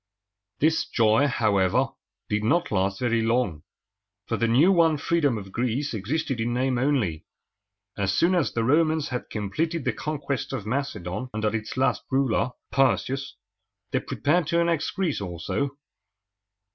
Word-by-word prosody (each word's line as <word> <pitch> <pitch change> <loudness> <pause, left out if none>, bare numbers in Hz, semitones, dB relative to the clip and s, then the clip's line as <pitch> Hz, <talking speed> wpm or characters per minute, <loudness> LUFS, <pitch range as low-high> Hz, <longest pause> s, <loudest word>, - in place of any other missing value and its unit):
This 160 +2 +2
joy, 115 +4 +3
however, 100 -7 +2 0.4
did 105 0 -1
not 170 +10 +1
last 100 +1 0
very 115 -2 +2
long, 115 -9 0 0.6
for 115 - -1
the 115 - +1
new 135 +11 +5
won 165 -4 +4
freedom 145 -5 +1
of 95 -2 -8
Greece 125 +5 -1
existed 130 +4 -2
in 120 +1 -1
name 130 0 +1
only. 120 - 0 0.7
As 100 -1 0
soon 170 - +3
as 175 -5 +1
the 115 - -1
Romans 155 +4 +2
had 125 -1 -4
completed 155 - -2
the - - +1
conquest 145 -3 -3
of 115 -6 -4
Macedon 110 -3 -3
under 110 0 0
its 110 +2 -4
last 130 - +2
ruler, 130 -3 +1 0.2
Perseus, 135 +1 +1 0.6
they - - +1
prepared 155 +2 0
to 170 - +2
annex 170 -2 +1
Greece 175 - -1
also. 100 - -3
125 Hz, 145 wpm, -25 LUFS, 110-150 Hz, 0.7 s, new